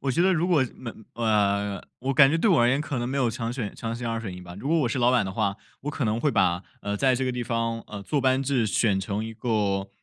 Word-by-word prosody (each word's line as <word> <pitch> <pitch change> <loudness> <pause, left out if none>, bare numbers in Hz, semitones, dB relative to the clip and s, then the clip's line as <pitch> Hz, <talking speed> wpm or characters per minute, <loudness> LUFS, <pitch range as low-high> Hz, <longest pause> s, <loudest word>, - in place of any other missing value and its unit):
我 135 - -1
觉 170 +7 +2
得 190 - +4
如 170 0 +1
果 170 -7 +3
嗯， 115 -3 -9
呃， 100 -3 +1 0.2
我 135 +2 -2
感 135 0 +7
觉 165 - +2
对 205 +6 +2
我 165 - +5
而 120 - +4
言 135 +3 +2
可 145 -4 -3
能 120 - -2
没 135 - -2
有 125 -4 +2
强 115 0 -3
选 120 -5 -4
强 115 0 -4
行 120 0 -4
二 115 0 -2
选 100 -5 -6
一 90 - -9
吧， 90 -1 -10
如 135 - -5
果 165 +1 +3
我 130 - +1
是 130 - -2
老 120 +1 +4
板 125 -5 +3
的 95 - -4
话， 100 0 0 0.3
我 145 - -3
可 145 -4 -2
能 110 +2 0
会 150 - +2
把 90 -3 +2 0.2
呃， 100 0 -2
在 130 +3 +3
这 130 +1 -1
个 130 - -1
地 125 0 -3
方 115 -1 -1
呃， 100 -1 -7
坐 140 +8 0
班 130 0 +2
制 130 -5 +1
选 100 -2 +2
成 105 +2 -3
一 115 - -6
个 105 -4 -1
120 Hz, 315 characters per minute, -26 LUFS, 105-135 Hz, 0.3 s, 感